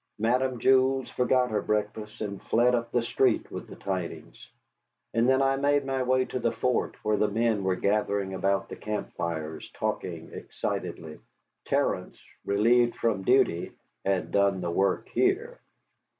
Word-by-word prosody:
Madame 125 Hz, +3 st, +1 dB
Jules 130 Hz, +1 st, +3 dB
forgot 125 Hz, 0 st, +2 dB
her 105 Hz, -1 st, 0 dB
breakfast, 105 Hz, +1 st, -3 dB
and 100 Hz, -2 st, -4 dB
fled 120 Hz, +2 st, +3 dB
up 115 Hz, -1 st, -1 dB
the 120 Hz, -1 st, +1 dB
street 120 Hz, 0 st, +1 dB
with -, -, -6 dB
the -, -, -10 dB
tidings. 95 Hz, -3 st, -5 dB, 0.6 s
And 115 Hz, +2 st, +3 dB
then 130 Hz, +1 st, +4 dB
I 135 Hz, 0 st, +2 dB
made 145 Hz, 0 st, +2 dB
my 135 Hz, -1 st, -1 dB
way 130 Hz, 0 st, +2 dB
to 130 Hz, -, -4 dB
the 115 Hz, -1 st, +1 dB
fort, 125 Hz, -2 st, 0 dB
where 105 Hz, 0 st, +2 dB
the 105 Hz, -, +2 dB
men 110 Hz, -1 st, +1 dB
were 95 Hz, -1 st, +1 dB
gathering 100 Hz, -1 st, 0 dB
about 95 Hz, +1 st, 0 dB
the -, -, -7 dB
camp 105 Hz, 0 st, -4 dB
fires, 80 Hz, -2 st, -4 dB
talking -, -, -4 dB
excitedly. 80 Hz, -2 st, -5 dB, 0.5 s
Terence, -, -, -1 dB, 0.2 s
relieved 120 Hz, +4 st, +3 dB
from 110 Hz, -4 st, 0 dB
duty, 95 Hz, -6 st, +2 dB, 0.3 s
had 95 Hz, -1 st, 0 dB
done 100 Hz, -1 st, +2 dB
the 85 Hz, -1 st, -2 dB
work 95 Hz, +3 st, +1 dB
here. 425 Hz, +6 st, 0 dB
115 Hz, 155 wpm, -27 LUFS, 100-130 Hz, 0.6 s, then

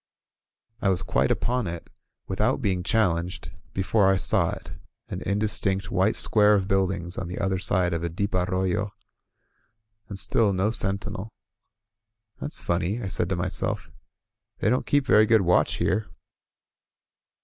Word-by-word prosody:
I 100 Hz, -, +2 dB
was 95 Hz, 0 st, +1 dB
quite -, -, +1 dB
upon 125 Hz, -3 st, 0 dB
it, 85 Hz, 0 st, -6 dB, 0.4 s
without 105 Hz, +8 st, 0 dB
being 95 Hz, -7 st, 0 dB
challenged, 90 Hz, -3 st, 0 dB, 0.2 s
be 95 Hz, -, -2 dB
fore 95 Hz, 0 st, +3 dB
I 95 Hz, -, +2 dB
saw -, -, +2 dB
it, -, -, -7 dB, 0.4 s
an -, -, -5 dB
indistinct 100 Hz, -2 st, 0 dB
white 95 Hz, +3 st, +2 dB
square 105 Hz, -1 st, +4 dB
of 95 Hz, -2 st, 0 dB
buildings 95 Hz, -2 st, -1 dB
on 95 Hz, -, -4 dB
the 90 Hz, -, -6 dB
other 95 Hz, -1 st, 0 dB
side 90 Hz, -2 st, 0 dB
of 85 Hz, -, -2 dB
a 85 Hz, -, -2 dB
deep 100 Hz, +5 st, -3 dB
arroyo. 95 Hz, +2 st, 0 dB, 1.2 s
And 100 Hz, -, -6 dB
still 100 Hz, +1 st, +2 dB
no 95 Hz, +4 st, +1 dB
sentinel. 100 Hz, -1 st, 0 dB, 1.1 s
"That's 150 Hz, -, -4 dB
funny,'* 90 Hz, +5 st, -1 dB
I 100 Hz, -, -4 dB
said 90 Hz, -, -2 dB
to 95 Hz, -, 0 dB
myself. 85 Hz, +1 st, -3 dB, 0.7 s
"They 110 Hz, -, +1 dB
don't 125 Hz, -, 0 dB
keep 145 Hz, -1 st, +2 dB
very 110 Hz, -4 st, +5 dB
good 110 Hz, -2 st, +5 dB
watch 90 Hz, -1 st, +2 dB
here." 110 Hz, -, 0 dB
95 Hz, 150 wpm, -25 LUFS, 90-105 Hz, 1.2 s, very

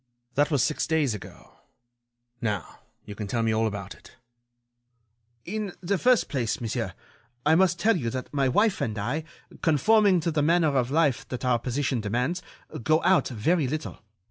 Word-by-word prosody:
"That 145 Hz, +3 st, +2 dB
was 140 Hz, -6 st, +2 dB
six 150 Hz, -, 0 dB
days 155 Hz, -6 st, +1 dB
ago. 105 Hz, -, -11 dB, 0.8 s
Now, 105 Hz, -7 st, -3 dB, 0.3 s
you 105 Hz, -, -7 dB
can 105 Hz, 0 st, -6 dB
tell 115 Hz, +3 st, -1 dB
me 110 Hz, -1 st, +1 dB
all 110 Hz, +1 st, +2 dB
about 100 Hz, -2 st, -5 dB
it." -, -, -18 dB, 1.3 s
"In 205 Hz, -1 st, -4 dB
the 190 Hz, +1 st, -1 dB
first 250 Hz, -1 st, +3 dB
place, 120 Hz, -6 st, -2 dB
monsieur, 115 Hz, -3 st, -3 dB, 0.5 s
I 155 Hz, -, +5 dB
must 180 Hz, +1 st, +3 dB
tell 220 Hz, +5 st, +3 dB
you 120 Hz, -9 st, -2 dB
that 130 Hz, +4 st, -6 dB
my 135 Hz, -2 st, +2 dB
wife 205 Hz, -, +2 dB
and 110 Hz, -2 st, -2 dB
I, 150 Hz, +10 st, -2 dB, 0.4 s
conforming 190 Hz, +5 st, +4 dB
to 170 Hz, -, -1 dB
the 150 Hz, -1 st, +1 dB
manner 160 Hz, -1 st, +3 dB
of 125 Hz, -2 st, +1 dB
life 150 Hz, -3 st, +1 dB
that 125 Hz, 0 st, -5 dB
our 125 Hz, -2 st, +2 dB
position 130 Hz, 0 st, -1 dB
demands, 125 Hz, -, -1 dB, 0.4 s
go 155 Hz, +7 st, +2 dB
out 190 Hz, -, +4 dB
very 140 Hz, +6 st, +1 dB
little. 155 Hz, +4 st, -4 dB
145 Hz, 170 wpm, -26 LUFS, 115-170 Hz, 1.3 s, I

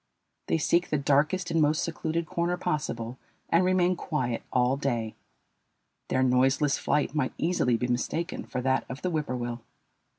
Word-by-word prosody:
They -, -, +2 dB
seek 170 Hz, +3 st, +2 dB
the 150 Hz, -, +1 dB
darkest 150 Hz, +6 st, +1 dB
and 165 Hz, -1 st, +2 dB
most 150 Hz, +1 st, +2 dB
secluded 165 Hz, 0 st, -2 dB
corner 170 Hz, +2 st, -1 dB
possible 125 Hz, -7 st, -3 dB, 0.3 s
and 170 Hz, +2 st, +4 dB
remain 185 Hz, 0 st, +3 dB
quiet 130 Hz, -9 st, -2 dB
all 125 Hz, +1 st, +3 dB
day. 120 Hz, -6 st, -2 dB, 0.9 s
Their 130 Hz, -, +1 dB
noiseless 130 Hz, +3 st, +3 dB
flight 150 Hz, -1 st, 0 dB
might 145 Hz, -4 st, 0 dB
easily 160 Hz, -8 st, +1 dB
be 125 Hz, -, -1 dB
mistaken 125 Hz, +8 st, -2 dB
for 125 Hz, -, -3 dB
that 130 Hz, +1 st, +1 dB
of 135 Hz, +2 st, -7 dB
the 180 Hz, -, 0 dB
whippoorwill. 125 Hz, -6 st, -2 dB
145 Hz, 155 wpm, -28 LUFS, 125-165 Hz, 0.9 s, and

